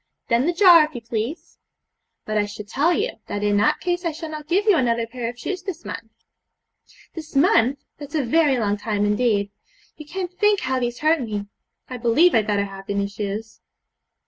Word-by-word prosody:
'Then 235 +5 +2
the 350 - +1
jar, 345 -3 +7
if 305 -2 -5
you 240 - -5
please.' 230 +7 -5 0.7
'But 215 - -3
I 205 -1 +1
should 205 0 -9
tell 295 +10 +1
you, 425 +7 -1
that 205 - -4
in 205 0 +2
that 205 - +2
case 355 0 -2
I 335 - 0
shall 315 +1 -7
not 305 -1 -7
give 380 +5 +1
you 415 -4 +5
another 235 -5 +1
pair 230 0 -5
of 240 - -9
shoes 365 +10 -4
this 370 -4 -7
month.' 225 -1 -7 1.0
'This 315 -3 -9
month! 275 - +4 0.2
that's 290 +1 -8
a 300 - +1
very 290 +1 +3
long 205 -3 0
time 205 -1 -1
indeed! 205 -2 +1 0.5
You 305 - -11
can't 365 +2 -5
think 415 +2 +2
how 260 0 -1
these 240 +1 -3
hurt 310 0 +3
me. 210 -4 -4 0.4
I 255 - -6
believe 245 +9 +4
I'd 220 -2 +2
better 205 -1 +1
have 195 -1 -10
the 200 - -2
new 200 0 0
shoes. 205 +2 -6
250 Hz, 205 wpm, -22 LUFS, 215-325 Hz, 1.0 s, jar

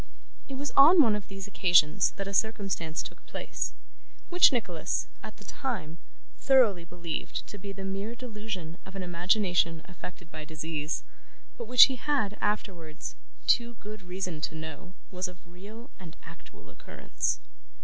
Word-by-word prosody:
It 270 - -4
was 280 0 -3
on 315 +6 +8
one 220 -4 +3
of 210 - -5
these 195 -1 -7
occasions 180 -3 +4
that 195 0 -4
a 200 - -5
circumstance 195 -7 0
took - - -10
place, - - -4 0.6
which 355 -2 +7
Nicholas, 185 - -1 0.2
at - - -9
the - - -13
time, 180 - -4 0.4
thoroughly 235 -10 +4
believed 170 -2 -5
to 205 - -10
be 200 +1 -6
the 195 0 -7
mere 195 +4 -4
delusion 210 -9 -6
of 190 - -12
an 190 - -3
imagination 175 -2 +1
affected 180 -1 -10
by 155 0 -7
disease; 155 0 -3 0.5
but 235 - -7
which 250 +1 +10
he 265 -2 +4
had, 245 -8 0
afterwards, 180 -7 -3 0.3
too 240 -1 +3
good 215 -1 -9
reason 180 -3 -4
to 160 - -3
know 160 +3 -8 0.2
was 185 0 -2
of 180 -1 -11
real 205 +8 -12
and 175 -3 -11
actual 165 0 -14
occurrence. - - -3
195 Hz, 155 wpm, -29 LUFS, 170-220 Hz, 0.6 s, which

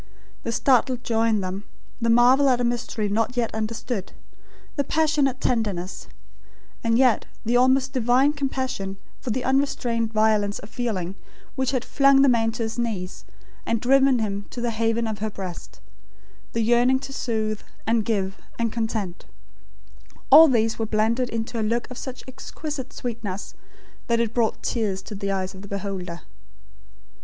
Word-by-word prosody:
The 230 - -3
startled 250 0 +2
joy 225 -2 +1
in 215 -3 +2
them; 190 +2 -4 0.4
the 230 - +1
marvel 250 +4 +6
at 250 -2 +3
a - - 0
mystery 235 -3 -1
not 225 +5 -1
yet 235 -2 0
understood; 220 -1 -3 0.6
the 285 - +1
passionate 295 -3 +1
tenderness; 205 -7 -1 0.8
and 230 0 +3
yet 255 -3 +3 0.2
the 235 +2 +1
almost 260 +2 +3
divine 255 +3 +3
compassion 260 -9 -3 0.2
for - - -6
the 245 +3 -1
unrestrained 245 -4 0
violence 215 -2 +2
of 200 - -11
feeling, 195 -8 -2 0.4
which 265 -1 0
had 255 -3 -1
flung 275 -1 +5
the 275 - +6
man 225 -2 +3
to 235 - -3
his 225 +1 -4
knees, 200 -6 -3 0.4
and 230 0 0
driven 270 +2 +4
him 205 -3 -2
to - - -7
the 240 0 -1
haven 225 +1 0
of 215 -2 -3
her 215 +1 -1
breast; 190 -4 -8 0.7
the 230 - 0
yearning 240 +3 +4
to 270 +1 -7
soothe, 220 -4 -2 0.2
and 225 0 +2
give, 195 -3 -1 0.2
and 230 -2 -1
content; 220 -6 -3 1.1
all 325 +1 +11
these 225 -4 +1
were 225 - -1
blended 225 +4 +1
into 230 +1 -3
a - - 0
look 230 +2 0
of 250 - -7
such 260 -1 -7
exquisite 265 +1 -6
sweetness, 220 -6 -5 0.5
that 235 -1 +2
it 230 -1 0
brought 230 -2 0
tears 200 -5 -1
to - - -8
the 200 0 -3
eyes 190 -1 -2
of 190 - -10
the 200 - -10
beholder. 190 -4 -5
230 Hz, 165 wpm, -24 LUFS, 215-255 Hz, 1.1 s, all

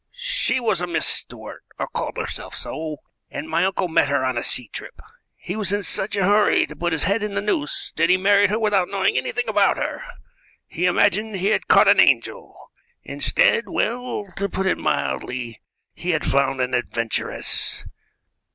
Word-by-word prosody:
She - - +1
was 220 -7 0
a 180 - -2
Miss 170 - 0
Stuart, - - -2
or - - -3
called - - -5
herself - - -4
so, 155 -2 -4 0.3
and 150 - -6
my 165 +2 0
uncle 190 -1 -1
met 160 -3 +2
her 140 -2 0
on 130 -1 -1
a 120 - -1
sea 125 - 0
trip. - - -9 0.4
He 185 - -6
was 210 -3 0
in 205 0 -1
such 195 +2 +1
a 200 - 0
hurry 205 +2 +3
to - - -11
put 175 0 -2
his 160 -2 0
head 200 +5 0
in 210 -1 -4
the - - +1
noose 175 -8 -1
that 165 +2 +2
he 180 - +5
married 200 +1 +3
her 210 - 0
without 205 -5 +1
knowing 195 -1 0
anything 245 -1 -1
about 205 -2 +2
her. - - -4 0.6
He 175 - -3
imagined 205 +3 +1
he 195 +2 0
had 215 - 0
caught - - +5
an - - +5
angel; - - +1 0.3
instead - - +1
well, 245 -3 -2
to 200 0 -1
put 190 +1 -3
it 190 - 0
mildly, 110 - -3 0.3
he 180 - -6
had 155 -3 0
found 135 -1 +1
an 125 0 -2
adventuress. 115 -2 -1
190 Hz, 190 wpm, -22 LUFS, 150-205 Hz, 0.6 s, he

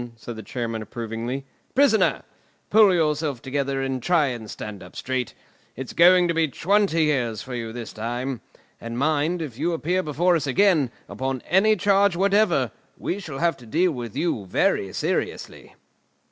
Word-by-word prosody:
said 115 +1 -8
the 110 - -7
Chairman 115 +1 -4
approvingly. 115 +4 -5 0.3
"Prisoner! 270 -5 +3 0.5
Pull 215 -2 +7
yourself 150 -5 0
together 135 +1 -2
and 135 -1 -2
try 170 +1 +3
and 115 -4 -6
stand 105 -2 -7
up 90 +1 -13
straight. 130 -2 -3 0.4
It's 130 +1 -7
going 180 +1 +6
to 170 - 0
be 165 -1 +2
twenty 185 +2 +2
years 125 -8 0
for 130 - -8
you 115 -2 -4
this 115 0 -7
time. 120 +3 -4 0.4
And 115 0 -6
mind, 155 +4 +1
if 130 -5 -8
you 170 +3 0
appear 175 +3 0
before 170 +3 +1
us 150 -3 -1
again, 165 -3 +3 0.2
upon 130 -1 -3
any 210 +4 +4
charge 200 -1 +3
whatever, 200 +4 +2 0.3
we 195 - -3
shall 155 -8 -7
have 170 +2 +1
to 120 - -15
deal 170 +9 +2
with 120 -6 -6
you 120 - -1
very 95 +1 +1
seriously!" - - -3
140 Hz, 165 wpm, -24 LUFS, 120-175 Hz, 0.5 s, Pull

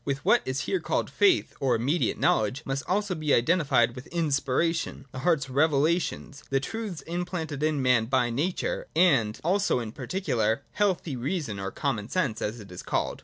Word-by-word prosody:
With 140 -1 -3
what - - +5
is 130 +1 -2
here 380 - -1
called - - -1
faith 380 -4 +3
or 130 -3 +2
immediate 140 +9 0
know - - +3
ledge 125 +8 -3
must 135 0 -2
also 205 +1 0
be 155 -4 +1
identified 130 -4 +2 0.2
inspiration, 160 -1 0
the 130 - -6
heart's 160 -3 +1
revelations, 150 +1 +1
the 135 - +2
truths 200 +1 -5
implanted 165 -3 -4
in 150 -3 +1
man 125 -3 +3
by 125 0 +1
nature, 330 - -2
and 125 -12 +3
also 190 -3 +2
in 115 -3 -5
particular, 120 - -1
healthy 185 -8 0
reason 130 - -3
or 95 0 -3
Common 110 -3 -3
Sense, 140 -12 -1
as 110 +3 -3
it 100 -3 -12
is 90 - -7
called. - - -2
140 Hz, 170 wpm, -27 LUFS, 125-175 Hz, 0.2 s, what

